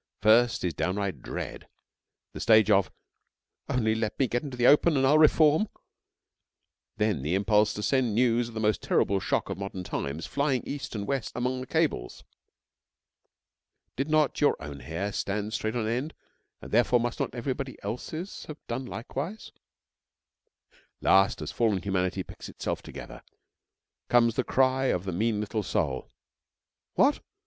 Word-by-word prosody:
First 115 +2 +4
is 90 -2 0
downright 95 -3 -2
dread; - - -6 0.7
the - - -7
stage 110 -1 +5
of 100 -2 +4 0.8
'only 110 -3 +1
let 110 -1 -2
me 135 - +2
get 120 +1 -1
into 135 -4 -7
the 120 - +2
open 150 +3 +5
and 135 - +3
I'll 150 +3 +5
reform,' 155 +5 +5 1.3
then 105 -8 +1
the 75 +7 0
impulse 105 +2 +3
to 105 - -4
send 125 -5 +1
news 120 0 +2
of 115 - -11
the - - -2
most 105 -1 +1
terrible 100 0 +1
shock - - -1
of - - -5
modern 95 -2 -5
times 75 -1 -4
flying 140 -3 0
east 140 -4 -5
and 100 -1 -3
west 135 0 -2
among 125 +1 -1
the 130 - -7
cables. 160 - -1 1.7
(Did 135 +4 -2
not 155 -2 +2
your 145 - +4
own 70 -2 -8
hair 90 +8 -4
stand 105 +2 -2
straight 110 +1 -2
on 115 -3 -1
end, 125 +7 -2 0.5
and, - - -9
therefore, 120 +2 +4
must 120 0 -2
not - - -2
everybody 130 +2 -4
else's 155 - -5
have 155 - -8
done 125 +2 -4
likewise?) 145 - -6 1.5
Last, 95 +1 +3
as - - -5
fallen 110 -5 +1
humanity 95 -1 -1
picks - - -10
itself - - -4
together, - - -10 0.9
comes 115 -1 +4
the 130 - 0
cry 130 +1 +2
of 90 -8 +1
the 95 - -3
mean 110 +3 0
little 105 +1 -2
soul: 70 -9 -2 0.9
'What! - - +4
115 Hz, 155 wpm, -28 LUFS, 100-130 Hz, 1.7 s, stage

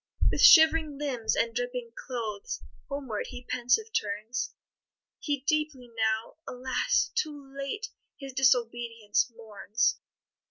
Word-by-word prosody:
With - - 0
shivering 320 -2 +7
limbs 265 -6 -1
and 230 0 +1
dripping 245 0 -3
clothes, 250 - -5 0.3
Homeward 270 -7 -4
he 250 -1 -9
pensive 255 - +1
turns; 215 +4 -2 0.7
He 285 -3 -2
deeply 295 -4 -1
now, 220 +2 0
alas! 250 0 0
too 290 -10 -3
late, 280 +11 -4 0.3
His 270 -1 -8
disobedience 235 -4 +1
mourns. 220 +1 -1
250 Hz, 110 wpm, -28 LUFS, 230-285 Hz, 0.7 s, shivering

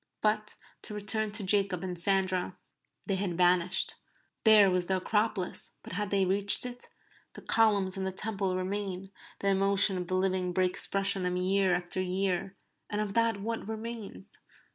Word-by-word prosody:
But 215 0 0 0.3
to 210 - -8
return 210 +1 -1
to 215 -1 -2
Jacob 195 -2 +1
and 180 -1 -4
Sandra. 185 0 0 0.5
They 195 - -1
had 185 -3 -3
vanished. 180 +1 +2 0.5
There 210 -3 +7
was 180 -1 0
the 190 - +1
Acropolis; 210 -1 -2
but - - -9
had 205 +2 -3
they 195 -1 +2
reached 200 +5 +5
it? 245 0 -7 0.4
The - - -11
columns 205 -4 +2
and 190 0 -2
the - - -2
Temple 195 -1 -3
remain; 190 0 -4 0.3
the 200 - +1
emotion 195 0 +3
of 180 - -5
the 185 - -1
living 185 -1 0
breaks 185 0 0
fresh 195 0 0
on 190 - -3
them 180 0 -1
year 190 0 +2
after 175 +1 -2
year; 185 0 -1 0.3
and 210 - -3
of 210 -2 -2
that 230 -2 +1
what 225 0 -4
remains? 220 - -7
195 Hz, 170 wpm, -29 LUFS, 185-210 Hz, 0.5 s, There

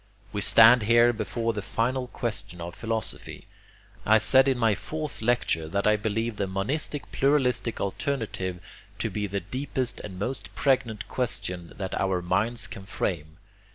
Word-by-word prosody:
We 105 - -2
stand 115 +3 +7
here 120 +2 +5
before 115 +1 -2
the 105 - -3
final 125 +6 -1
question 105 -7 -4
of 85 0 -6
philosophy. 115 -1 -4 0.6
I 110 +1 +5
said 130 +5 +6
in 135 -2 +2
my 115 -3 +3
fourth 155 +7 -5
lecture 110 -9 +1
that 100 +5 -1
I 105 - +5
believed 110 +1 -2
the 100 - 0
monistic 135 +10 -2
pluralistic 130 -4 +1
alternative 100 -5 -3 0.4
to 110 +1 -2
be 105 +1 -2
the 100 0 -3
deepest 130 +4 -3
and 95 -3 -8
most 120 +7 -5
pregnant 115 -6 0
question 90 -8 0
that 95 -3 -4
our 95 -2 +1
minds 105 +7 0
can 95 - -8
frame. 80 -5 -3
110 Hz, 155 wpm, -26 LUFS, 100-125 Hz, 0.6 s, stand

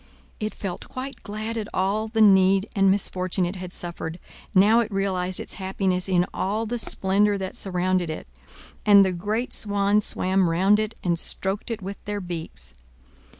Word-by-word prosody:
It 215 0 -3
felt 190 -3 -6
quite 265 +2 -7
glad 215 +2 -5
at 215 -2 -3
all 200 +4 0
the 220 0 0
need 195 -1 +5
and 195 -1 +4
misfortune 185 -1 0
it 180 +3 -4
had 180 -1 -7
suffered, 170 -2 -5 0.4
now 210 +5 +6
it 230 -2 -1
realized 185 -2 -1
its - - -7
happiness 190 -1 -1
in 180 -1 +3
all 210 +4 -1
the 240 +2 -3
splendor 205 0 +2
that 190 -1 -5
surrounded 185 -2 0
it. 155 - -5 0.6
And 200 -2 +7
the 190 - +1
great 210 +7 -2
swans 205 0 +1
swam 185 -2 +1
round 190 +5 +3
it, 215 +1 -2
and 170 -2 +1
stroked 195 +7 -2
it 225 -4 -4
with 195 +1 -7
their 205 0 -3
beaks. 160 - -7
195 Hz, 170 wpm, -24 LUFS, 185-210 Hz, 0.6 s, And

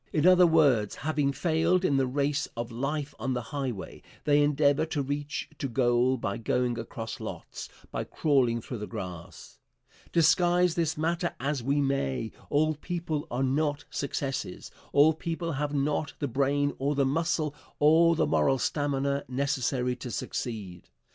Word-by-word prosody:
In 150 +1 +1
other 180 -1 +7
words, 140 -10 +3
having 145 0 0
failed 165 +5 +1
in 140 -6 +3
the 135 -1 +2
race 140 +2 0
of 120 0 -4
life 140 +4 -3
on 130 +3 -1
the 125 - -2
highway, 130 -8 -4 0.2
they 145 0 +4
endeavor 145 0 +3
to 150 -3 -1
reach 145 +1 -3
to 140 - -1
goal 125 +1 +2
by 100 -3 -3
going 120 +1 0
across 115 0 -6
lots, - - -7 0.2
by - - -3
crawling 125 -6 +1
through 120 0 -6
the 105 - -5
grass. 90 -5 -8 0.5
Disguise 175 +1 +4
this 165 -3 0
matter 170 +3 -1
as 140 0 -1
we 140 +4 +1
may, 115 - -1 0.2
all 155 +2 +2
people 160 -1 -4
are 125 +3 -1
not 145 +2 0
successes, 135 -8 -3 0.2
all 150 +3 +6
people 165 +1 -3
have 145 0 -2
not 145 +1 0
the 145 - -2
brain 140 +3 +1
or 140 +2 0
the 140 -1 +2
muscle 155 +1 0 0.2
or 165 +3 +5
the - - +2
moral 80 - +2
stamina 140 0 0
necessary 130 -2 0
to 125 - -7
succeed. 105 -7 -5
140 Hz, 155 wpm, -28 LUFS, 125-155 Hz, 0.5 s, other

